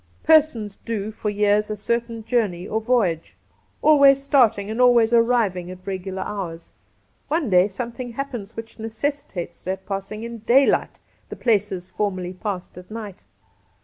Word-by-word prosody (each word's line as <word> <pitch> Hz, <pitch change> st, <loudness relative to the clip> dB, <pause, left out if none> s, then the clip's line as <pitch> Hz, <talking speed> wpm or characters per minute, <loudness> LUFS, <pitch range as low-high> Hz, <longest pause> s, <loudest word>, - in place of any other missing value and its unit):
Persons 250 Hz, -11 st, +3 dB
do 215 Hz, -2 st, -3 dB
for 215 Hz, 0 st, -3 dB
years 210 Hz, +1 st, +2 dB
a 215 Hz, -, -2 dB
certain 230 Hz, +1 st, -2 dB
journey 205 Hz, -8 st, 0 dB
or 220 Hz, -, -1 dB
voyage, 215 Hz, -9 st, 0 dB, 0.5 s
always 280 Hz, -3 st, +6 dB
starting 225 Hz, -7 st, +3 dB
and 225 Hz, +3 st, -1 dB
always 240 Hz, -2 st, +5 dB
arriving 230 Hz, -7 st, +2 dB
at 185 Hz, 0 st, -10 dB
regular 190 Hz, 0 st, -4 dB
hours. 175 Hz, -5 st, -6 dB, 0.5 s
One 295 Hz, -, -1 dB
day 180 Hz, +1 st, +5 dB
something 235 Hz, +4 st, -6 dB
happens 235 Hz, -5 st, -5 dB
which 225 Hz, 0 st, -9 dB
necessitates 225 Hz, -, -4 dB
their 190 Hz, +1 st, -3 dB
pass 195 Hz, +1 st, -5 dB
ing 215 Hz, +1 st, -6 dB
in 235 Hz, 0 st, -6 dB
daylight 250 Hz, +6 st, +3 dB, 0.3 s
the -, -, -6 dB
places 200 Hz, -5 st, 0 dB
formerly 185 Hz, -3 st, -2 dB
passed 185 Hz, -2 st, -5 dB
at 180 Hz, -, -15 dB
night. 215 Hz, -3 st, -8 dB
215 Hz, 145 wpm, -23 LUFS, 195-240 Hz, 0.5 s, always